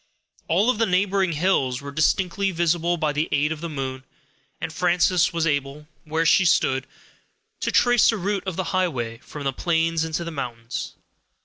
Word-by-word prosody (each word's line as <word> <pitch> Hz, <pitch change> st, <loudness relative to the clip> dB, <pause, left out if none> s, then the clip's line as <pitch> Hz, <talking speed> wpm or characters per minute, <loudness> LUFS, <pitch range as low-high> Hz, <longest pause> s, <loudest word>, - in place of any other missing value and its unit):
All 200 Hz, +9 st, +3 dB
of 225 Hz, -, -5 dB
the 225 Hz, -, +3 dB
neighboring 190 Hz, -1 st, +1 dB
hills 145 Hz, -7 st, +1 dB
were 140 Hz, 0 st, -8 dB
distinctly 180 Hz, +6 st, +1 dB
visible 175 Hz, 0 st, +1 dB
by 155 Hz, -2 st, 0 dB
the 150 Hz, +2 st, -1 dB
aid 145 Hz, +2 st, +1 dB
of 155 Hz, -1 st, -4 dB
the 170 Hz, -, -4 dB
moon, 130 Hz, -3 st, -5 dB, 0.6 s
and 165 Hz, -1 st, -5 dB
Frances 180 Hz, +1 st, +2 dB
was 165 Hz, -1 st, -1 dB
able, 145 Hz, 0 st, -2 dB, 0.2 s
where 160 Hz, +1 st, -1 dB
she 190 Hz, -, +5 dB
stood, 130 Hz, -6 st, +2 dB, 0.7 s
to -, -, -1 dB
trace 245 Hz, -2 st, +4 dB
the 225 Hz, -, +1 dB
route 195 Hz, 0 st, -2 dB
of 185 Hz, -, -2 dB
the 190 Hz, -, -1 dB
highway, 130 Hz, -12 st, -1 dB
from 145 Hz, +2 st, -9 dB
the 135 Hz, -1 st, -1 dB
plains 165 Hz, +1 st, 0 dB
into 160 Hz, +1 st, -3 dB
the 170 Hz, -, -5 dB
mountains. 120 Hz, -5 st, -5 dB
165 Hz, 180 wpm, -23 LUFS, 145-180 Hz, 0.7 s, she